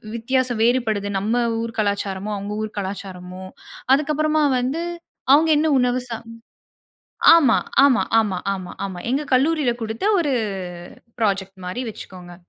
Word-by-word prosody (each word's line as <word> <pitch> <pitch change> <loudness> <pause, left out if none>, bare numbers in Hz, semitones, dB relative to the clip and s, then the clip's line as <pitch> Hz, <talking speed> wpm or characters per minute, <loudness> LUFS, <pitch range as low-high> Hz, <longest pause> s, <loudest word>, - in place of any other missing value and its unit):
வித்தியாச 255 +3 0
வேறுபடுது? 225 -4 +1
நம்ம 230 +5 0 0.2
ஊர் 230 0 -6
கலாச்சாரமும், 200 0 -2
அவுங்க 205 +1 -5
ஊர் 215 - -7
கலாச்சாரமும், 185 -1 -7 0.4
அதுக்கப்புறமா 305 +1 +2
வந்து 270 +7 -2 0.5
அவுங்க 315 +3 +5
என்ன 315 - +2
உணவு 250 0 +1
சா 230 - -3 1.2
ஆமா 280 -8 +5 0.3
ஆமா 265 -4 +5 0.2
ஆமா 205 -5 +1 0.2
ஆமா, 185 -2 -7
ஆமா. 190 -2 -5
எங்க 275 +4 0
கல்லூரில 280 0 +3
குடுத்த 220 - -4 0.2
ஒரு 290 -4 0 0.9
ப்ராஜெக்ட் 195 -2 -1
மாரி 245 +8 -4
வச்சுக்கோங்க. 180 -3 -11
225 Hz, 125 wpm, -21 LUFS, 195-265 Hz, 1.2 s, அவுங்க